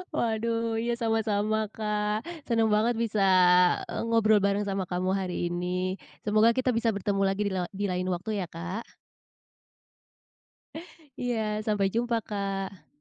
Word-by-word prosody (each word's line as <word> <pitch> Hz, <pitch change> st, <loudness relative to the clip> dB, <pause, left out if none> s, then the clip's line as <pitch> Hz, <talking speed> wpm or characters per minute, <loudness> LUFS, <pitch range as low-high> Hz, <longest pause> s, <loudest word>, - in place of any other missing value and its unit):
Waduh 230 Hz, 0 st, 0 dB
iya 235 Hz, +1 st, 0 dB
sama-sama, 220 Hz, -2 st, 0 dB
Kak. 210 Hz, +1 st, -2 dB, 0.2 s
Senang 225 Hz, -2 st, +2 dB
banget 220 Hz, +3 st, +2 dB
bisa, 225 Hz, -2 st, -1 dB, 0.7 s
eee, -, -, -3 dB
ngobrol 220 Hz, -2 st, +4 dB
bareng 200 Hz, +1 st, +1 dB
sama 195 Hz, -2 st, -2 dB
kamu 185 Hz, +1 st, -1 dB
hari 180 Hz, -2 st, -2 dB
ini. 180 Hz, +2 st, -2 dB, 0.2 s
Semoga 215 Hz, +2 st, +4 dB
kita 255 Hz, 0 st, +1 dB
bisa 230 Hz, -2 st, 0 dB
bertemu 200 Hz, 0 st, -1 dB
lagi 195 Hz, +1 st, -1 dB
di -, -, -2 dB
lewa 180 Hz, -2 st, -1 dB
di 205 Hz, +1 st, -1 dB
lain 180 Hz, 0 st, -2 dB
waktu 190 Hz, +4 st, -2 dB
ya, 180 Hz, -, -3 dB
Kak. 180 Hz, +7 st, -5 dB, 2.4 s
Iya, 245 Hz, -1 st, 0 dB, 0.3 s
sampai 205 Hz, -3 st, +2 dB
jumpa, 235 Hz, 0 st, +1 dB
Kak. 195 Hz, -2 st, -4 dB
210 Hz, 140 wpm, -28 LUFS, 195-225 Hz, 2.4 s, ngobrol